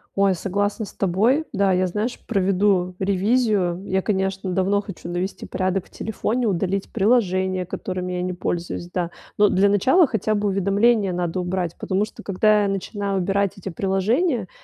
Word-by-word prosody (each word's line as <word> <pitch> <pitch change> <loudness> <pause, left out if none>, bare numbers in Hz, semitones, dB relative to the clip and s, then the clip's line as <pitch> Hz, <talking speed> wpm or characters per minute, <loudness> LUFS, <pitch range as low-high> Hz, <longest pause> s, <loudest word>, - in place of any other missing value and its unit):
Ой, 195 -1 +3
согласна 205 +4 -1
с - - -11
тобой. 220 - +2
Да, 200 -2 +2
я 185 0 +2
знаешь, 210 +7 -3
проведу 190 -3 +1
ревизию. 195 -2 +1
Я, 190 0 +1
конечно, 190 -1 -1
давно 195 +2 +1
хочу 195 -4 -9
навести 175 +3 -3
порядок 185 0 -1
в - - -21
телефоне, 230 +2 -2
удалить 195 0 -1
приложения, 190 -4 +1
которыми 185 0 -4
я 180 - -2
не 180 0 -2
пользуюсь, 175 0 -4
да. 175 -2 -1 0.3
Но, 210 - +6
для 200 +1 +3
начала, 260 - +4
хотя 215 -2 0
бы 205 0 0
уведомления 200 +1 +2
надо 175 0 -2
убрать, 180 -1 -2
потому 190 +2 0
что 215 - -8
когда 210 +2 +3
я - - +1
начинаю 195 0 -2
убирать 195 +1 0
эти 195 0 -6
приложения, 200 - 0
195 Hz, 165 wpm, -22 LUFS, 185-205 Hz, 0.3 s, Но